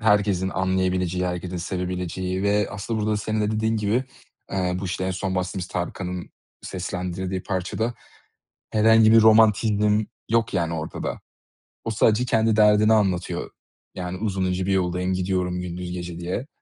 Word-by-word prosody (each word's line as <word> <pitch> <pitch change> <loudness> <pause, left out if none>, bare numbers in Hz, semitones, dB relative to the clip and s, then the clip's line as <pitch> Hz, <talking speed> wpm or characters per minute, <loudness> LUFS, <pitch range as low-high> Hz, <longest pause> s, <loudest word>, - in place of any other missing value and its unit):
Herkesin 105 -4 +2
anlayabileceği, 95 -1 0
herkesin 90 0 -4
sevebileceği 90 +1 -3
ve 105 +1 +2
aslında 110 +3 -3
burada 105 0 +1
senin 110 +1 -2
de 105 - 0
dediğin 110 +1 0
gibi, 110 +4 +1 0.5
eee, 90 -2 0
bu, - - -4
işte, 90 0 -2
en 95 - -1
son 95 +1 -2
bahsettiğimiz 90 0 -2
Tarkan'ın 90 0 -4 0.3
seslendirdiği 90 0 -4
parçada 100 +5 -2 0.8
herhangi 110 0 +5
bir 115 - +8
romantizm 110 -1 +4 0.3
yok, 115 -3 +2
yani 85 -2 0
ortada. 80 -1 -4 0.6
O 115 - -1
sadece 110 +2 +3
kendi 110 -2 +2
derdini 105 0 +5
anlatıyor. 95 -5 0 0.4
Yani, 90 0 -4
"Uzun 95 -3 -1
ince 90 0 -1
bir 100 - 0
yoldayım, 90 0 0
gidiyorum 90 -1 -1
gündüz 90 0 -5
gece." 90 -1 -6
diye. 90 +10 -3
95 Hz, 145 wpm, -24 LUFS, 90-105 Hz, 0.8 s, bir